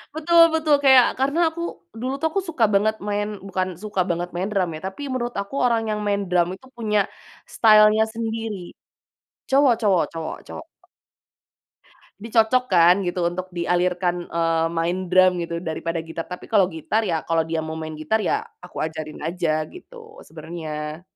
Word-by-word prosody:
Betul 335 Hz, +2 st, +3 dB
betul. 315 Hz, -2 st, +3 dB
Kayak, 265 Hz, -3 st, +7 dB
karena 280 Hz, +5 st, +1 dB
aku 330 Hz, +1 st, -8 dB, 0.4 s
dulu 255 Hz, +3 st, -2 dB
tuh 320 Hz, -, +1 dB
aku 390 Hz, -, 0 dB
suka 270 Hz, -9 st, +2 dB
banget 215 Hz, +2 st, +3 dB
main 205 Hz, 0 st, -1 dB, 0.2 s
bukan 185 Hz, -1 st, -1 dB, 0.2 s
suka 210 Hz, -3 st, -1 dB
banget 175 Hz, +1 st, -2 dB
main 185 Hz, +2 st, -1 dB
drum 190 Hz, -4 st, 0 dB
ya, -, -, -7 dB
tapi 190 Hz, +9 st, -8 dB
menurut 240 Hz, -1 st, -3 dB
aku 200 Hz, +7 st, -8 dB
orang 235 Hz, -2 st, +2 dB
yang 210 Hz, -, -1 dB
main 200 Hz, 0 st, 0 dB
drum 175 Hz, -1 st, +3 dB
itu 260 Hz, +7 st, -18 dB
punya 210 Hz, -3 st, +1 dB, 0.6 s
style-nya 215 Hz, 0 st, +6 dB
sendiri. 225 Hz, -2 st, -3 dB, 0.9 s
Cowok 275 Hz, -1 st, +5 dB
cowok 195 Hz, -6 st, +3 dB
cowok 165 Hz, -1 st, -5 dB
cowok. -, -, -8 dB, 1.6 s
Dicocokkan 220 Hz, -5 st, +3 dB
gitu 175 Hz, 0 st, -1 dB
untuk 180 Hz, +2 st, -2 dB
dialirkan, 175 Hz, 0 st, 0 dB
eee, 165 Hz, -1 st, +1 dB
main 175 Hz, +3 st, -1 dB
drum 185 Hz, -1 st, +4 dB
gitu 170 Hz, 0 st, -4 dB
daripada 165 Hz, 0 st, -3 dB
gitar. 165 Hz, 0 st, -6 dB
Tapi 180 Hz, -, -8 dB
kalau 200 Hz, -4 st, +4 dB
gitar, 165 Hz, +7 st, -1 dB
ya 165 Hz, -3 st, -1 dB
kalau 165 Hz, -1 st, +2 dB
dia 160 Hz, -1 st, -2 dB
mau 160 Hz, 0 st, -5 dB
main 155 Hz, -1 st, -6 dB
gitar, 155 Hz, +9 st, 0 dB
ya 190 Hz, -, 0 dB, 0.2 s
aku 180 Hz, -, -12 dB
ajarin 155 Hz, -1 st, -6 dB
aja 160 Hz, -2 st, -1 dB
gitu 450 Hz, +4 st, -14 dB
sebenernya. 155 Hz, -2 st, -6 dB
185 Hz, 160 wpm, -23 LUFS, 170-225 Hz, 1.6 s, Kayak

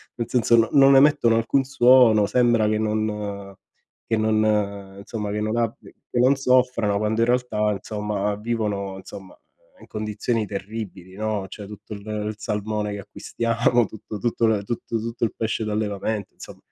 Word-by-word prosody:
nel 115 Hz, -2 st, -3 dB
senso 120 Hz, -1 st, +3 dB
no 115 Hz, 0 st, +4 dB
non 135 Hz, 0 st, +7 dB
emettono 135 Hz, -5 st, +4 dB
alcun 125 Hz, +4 st, +1 dB
suono, 125 Hz, -4 st, +5 dB
sembra 120 Hz, -1 st, +2 dB
che 110 Hz, 0 st, +1 dB
non 105 Hz, -2 st, -3 dB, 0.5 s
che 115 Hz, -, +1 dB
non 105 Hz, -3 st, 0 dB
insomma 105 Hz, +1 st, -5 dB
che 105 Hz, -, -2 dB
non 110 Hz, +1 st, -1 dB
abbi 115 Hz, -1 st, -3 dB, 0.2 s
che 120 Hz, -, 0 dB
non 130 Hz, +3 st, +5 dB
soffrano 125 Hz, -5 st, +2 dB
quando 110 Hz, +2 st, 0 dB
in 115 Hz, -, +3 dB
realtà 120 Hz, -4 st, +1 dB
insomma 105 Hz, 0 st, -3 dB
vivono, 105 Hz, -3 st, -3 dB
insomma, 95 Hz, 0 st, -11 dB, 0.4 s
in -, -, -15 dB
condizioni 110 Hz, +1 st, -2 dB
terribili, 100 Hz, -2 st, -7 dB
no, 105 Hz, -1 st, -2 dB
cioè 105 Hz, -, -9 dB
tutto 105 Hz, +1 st, -10 dB
il 100 Hz, -1 st, -9 dB
il 105 Hz, 0 st, -3 dB
salmone 105 Hz, 0 st, -3 dB
che 100 Hz, -, -5 dB
acquistiamo, 115 Hz, +3 st, 0 dB
tutto 110 Hz, 0 st, -8 dB
tutto 115 Hz, +2 st, 0 dB
le 105 Hz, -2 st, +1 dB
tutto 115 Hz, +1 st, -3 dB
tutto 115 Hz, +2 st, -5 dB
il 115 Hz, -, 0 dB
pesce 110 Hz, 0 st, -2 dB
d'allevamento 105 Hz, -1 st, -3 dB
insomm -, -, -12 dB
110 Hz, 160 wpm, -23 LUFS, 105-115 Hz, 0.5 s, non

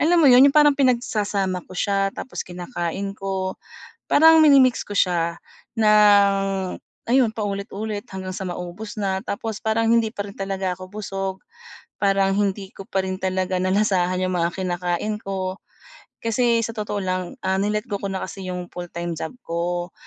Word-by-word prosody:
alam 340 Hz, +4 st, +4 dB
mo -, -, +4 dB
'yon 250 Hz, +2 st, +8 dB
yung 280 Hz, -, -1 dB
parang 295 Hz, -1 st, +7 dB
pinagsasama 210 Hz, -8 st, 0 dB
ko -, -, -11 dB
siya 195 Hz, 0 st, +1 dB
tapos 260 Hz, -, -6 dB
kinakain 180 Hz, +1 st, -4 dB
ko 190 Hz, -1 st, -3 dB, 0.5 s
parang 320 Hz, +1 st, +7 dB
mini-mix 270 Hz, -5 st, +5 dB
ko 205 Hz, -, -8 dB
siya 170 Hz, -2 st, +1 dB, 0.4 s
ng 205 Hz, -2 st, +6 dB, 0.7 s
ayun 250 Hz, -2 st, +4 dB
paulit-ulit 205 Hz, 0 st, -4 dB
hanggang 185 Hz, -1 st, -5 dB
sa 195 Hz, -, -4 dB
maubos 180 Hz, +5 st, -7 dB
na 190 Hz, -1 st, -1 dB
tapos 215 Hz, +1 st, -4 dB
parang 225 Hz, +1 st, +1 dB
hindi 230 Hz, -1 st, +3 dB
pa 205 Hz, -2 st, -4 dB
rin 200 Hz, -, -11 dB
talaga 195 Hz, -1 st, -2 dB
ako 185 Hz, 0 st, -11 dB
busog 195 Hz, -2 st, -4 dB, 0.7 s
parang 195 Hz, -1 st, +2 dB
hindi 200 Hz, -1 st, -1 dB
ko -, -, -8 dB
pa 190 Hz, -, -1 dB
rin 185 Hz, 0 st, -2 dB
talaga 185 Hz, 0 st, -1 dB
nalasahan 185 Hz, -2 st, +1 dB
yung 185 Hz, 0 st, -1 dB
mga 170 Hz, 0 st, +1 dB
kinakain 180 Hz, +3 st, -2 dB
ko. 190 Hz, -1 st, -3 dB, 0.7 s
Kasi 230 Hz, 0 st, +2 dB
sa 230 Hz, -, -5 dB
totoo 210 Hz, -2 st, -3 dB
lang, 185 Hz, -1 st, -3 dB
ah, 190 Hz, -, +2 dB
ni-let 210 Hz, +1 st, -1 dB
go 200 Hz, -1 st, -4 dB
ko 200 Hz, -, -3 dB
na 190 Hz, -, -3 dB
kasi 190 Hz, -2 st, -7 dB
yung 180 Hz, -1 st, -4 dB
full-time 175 Hz, -1 st, -5 dB
job 160 Hz, 0 st, -5 dB
ko, 175 Hz, +1 st, -2 dB
195 Hz, 165 wpm, -23 LUFS, 185-215 Hz, 0.7 s, yon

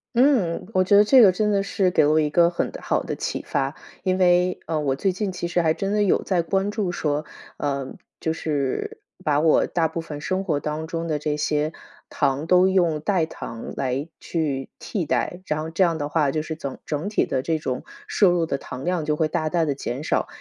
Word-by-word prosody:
嗯， 240 Hz, -10 st, +3 dB
我 185 Hz, -, +4 dB
觉 195 Hz, +2 st, +4 dB
得 205 Hz, -, +8 dB
这 255 Hz, +4 st, +7 dB
个 200 Hz, -5 st, +8 dB
真 210 Hz, +3 st, 0 dB
的 200 Hz, -1 st, +2 dB
是 195 Hz, -2 st, +1 dB
给 150 Hz, -, +4 dB
我 155 Hz, +1 st, +4 dB
一 150 Hz, -1 st, +1 dB
个 170 Hz, +2 st, +4 dB
很 175 Hz, -, -2 dB
好 -, -, 0 dB
的 -, -, -4 dB
启 -, -, -3 dB
发， 135 Hz, +2 st, -1 dB, 0.3 s
因 185 Hz, -1 st, +1 dB
为， 180 Hz, 0 st, +3 dB
呃， 160 Hz, -2 st, -1 dB
我 140 Hz, -3 st, 0 dB
最 190 Hz, +7 st, +1 dB
近 190 Hz, +1 st, -2 dB
其 180 Hz, -1 st, -4 dB
实 175 Hz, 0 st, +1 dB
还 160 Hz, -1 st, +3 dB
真 195 Hz, +4 st, -3 dB
的 210 Hz, -, +2 dB
有 205 Hz, -, +2 dB
在 180 Hz, -3 st, +1 dB
关 195 Hz, +5 st, 0 dB
注 205 Hz, -4 st, -1 dB
说， 150 Hz, -3 st, -1 dB, 0.3 s
呃， 140 Hz, -2 st, -2 dB, 0.3 s
就 160 Hz, -, -1 dB
是 160 Hz, -, -2 dB, 0.2 s
把 145 Hz, -2 st, +2 dB
我 160 Hz, -1 st, +4 dB
大 165 Hz, -2 st, +1 dB
部 165 Hz, +1 st, -4 dB
分 150 Hz, -3 st, -7 dB
生 185 Hz, +4 st, -1 dB
活 155 Hz, -7 st, 0 dB
当 155 Hz, +2 st, -4 dB
中 165 Hz, 0 st, -3 dB
的 155 Hz, -2 st, -1 dB
这 150 Hz, 0 st, -1 dB
些 150 Hz, +1 st, 0 dB, 0.4 s
糖 140 Hz, +4 st, 0 dB
都 180 Hz, +1 st, +5 dB
用 175 Hz, -5 st, +2 dB
代 180 Hz, -1 st, +1 dB
糖 115 Hz, -7 st, -7 dB
来 135 Hz, +3 st, -2 dB
去 145 Hz, -5 st, -2 dB
替 190 Hz, -8 st, -3 dB
代， 180 Hz, +5 st, -1 dB
然 150 Hz, -4 st, -1 dB
后 160 Hz, -, -4 dB
这 170 Hz, +4 st, +2 dB
样 170 Hz, -3 st, +2 dB
的 145 Hz, -, -2 dB
话 145 Hz, -2 st, +2 dB
就 155 Hz, -, -1 dB
是 160 Hz, 0 st, -5 dB
整 140 Hz, -4 st, -6 dB
整 155 Hz, +6 st, -2 dB
体 210 Hz, -, +1 dB
的 130 Hz, -1 st, -1 dB
这 160 Hz, -1 st, 0 dB
种 130 Hz, -4 st, -3 dB, 0.2 s
摄 195 Hz, -4 st, +4 dB
入 170 Hz, -2 st, +1 dB
的 140 Hz, -, -1 dB
糖 130 Hz, +1 st, -8 dB
量 175 Hz, -4 st, 0 dB
就 150 Hz, -, +1 dB
会 155 Hz, 0 st, +1 dB
大 155 Hz, 0 st, -1 dB
大 165 Hz, 0 st, +1 dB
地 145 Hz, -2 st, -1 dB
减 135 Hz, +1 st, -4 dB
少。 -, -, 0 dB
165 Hz, 245 characters per minute, -23 LUFS, 150-185 Hz, 0.4 s, 得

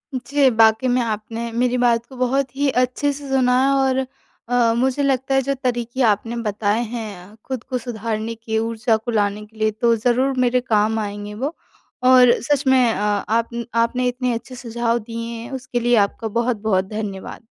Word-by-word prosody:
जी, 265 Hz, +2 st, +2 dB
बाकी 225 Hz, +2 st, +4 dB
में 250 Hz, 0 st, +2 dB
आपने 225 Hz, +1 st, -4 dB
मेरी 245 Hz, +2 st, +1 dB
बात 235 Hz, -2 st, +2 dB
को 265 Hz, -, -14 dB
बहुत 255 Hz, +1 st, 0 dB
ही 285 Hz, +1 st, +1 dB
अच्छे 255 Hz, +3 st, +1 dB
से 285 Hz, 0 st, -9 dB
सुना 260 Hz, -2 st, +3 dB
है 270 Hz, -, +3 dB
और 265 Hz, -1 st, +2 dB, 0.5 s
अ, 240 Hz, -2 st, +3 dB
मुझे 265 Hz, +3 st, +1 dB
लगता 270 Hz, -1 st, 0 dB
है, 270 Hz, -, +4 dB
जो 275 Hz, +1 st, -1 dB
तरीके 240 Hz, 0 st, -1 dB
आपने 225 Hz, +1 st, +1 dB
बताए 215 Hz, -1 st, -1 dB
हैं, 215 Hz, -4 st, -7 dB
खुद 260 Hz, -3 st, -4 dB
को 255 Hz, -, -3 dB
सुधारने 225 Hz, -1 st, -4 dB
के, 225 Hz, 0 st, -3 dB
ऊर्जा 225 Hz, 0 st, 0 dB
को 220 Hz, +2 st, -5 dB
लाने 210 Hz, -1 st, 0 dB
के 220 Hz, +1 st, -22 dB
लिए, 215 Hz, 0 st, +1 dB
तो 230 Hz, +2 st, +2 dB
ज़रूर 245 Hz, +4 st, +1 dB
मेरे 250 Hz, 0 st, +2 dB
काम 220 Hz, -2 st, +1 dB
आएँगे 205 Hz, 0 st, -5 dB
वो 275 Hz, +10 st, -4 dB, 0.5 s
और 255 Hz, -1 st, +7 dB
सच 285 Hz, +3 st, 0 dB
में 255 Hz, -3 st, +4 dB
अ, -, -, -4 dB
आपन 230 Hz, +3 st, -1 dB, 0.2 s
आपने 250 Hz, +2 st, -1 dB
इतने 250 Hz, 0 st, -1 dB
अच्छे 235 Hz, +3 st, -6 dB
सुझाव 235 Hz, -1 st, -1 dB
दिए 230 Hz, +1 st, -6 dB
हैं, 235 Hz, -, -9 dB
उसके 250 Hz, -2 st, -3 dB
लिए 240 Hz, 0 st, +3 dB
आपका 225 Hz, +3 st, -7 dB
बहुत-बहुत 220 Hz, -5 st, 0 dB
धन्यवाद। 200 Hz, -2 st, -6 dB
235 Hz, 185 wpm, -21 LUFS, 220-255 Hz, 0.5 s, और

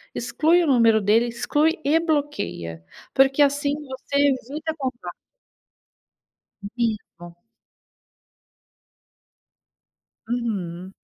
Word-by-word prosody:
Exclui 340 Hz, +3 st, +2 dB
o -, -, -1 dB
número 230 Hz, -5 st, +4 dB
dele, 220 Hz, +4 st, +3 dB
exclui 295 Hz, +8 st, 0 dB
e 300 Hz, +4 st, +3 dB
bloqueia, 280 Hz, -, -3 dB, 0.3 s
porque 270 Hz, +2 st, +4 dB
assim 285 Hz, 0 st, +1 dB
você 280 Hz, -2 st, -8 dB
evita 285 Hz, +3 st, 0 dB
contato. 260 Hz, -4 st, -5 dB, 1.6 s
Vivo. 210 Hz, -7 st, -4 dB, 2.9 s
Uhum. 190 Hz, -7 st, -4 dB
260 Hz, 75 wpm, -23 LUFS, 220-290 Hz, 2.9 s, número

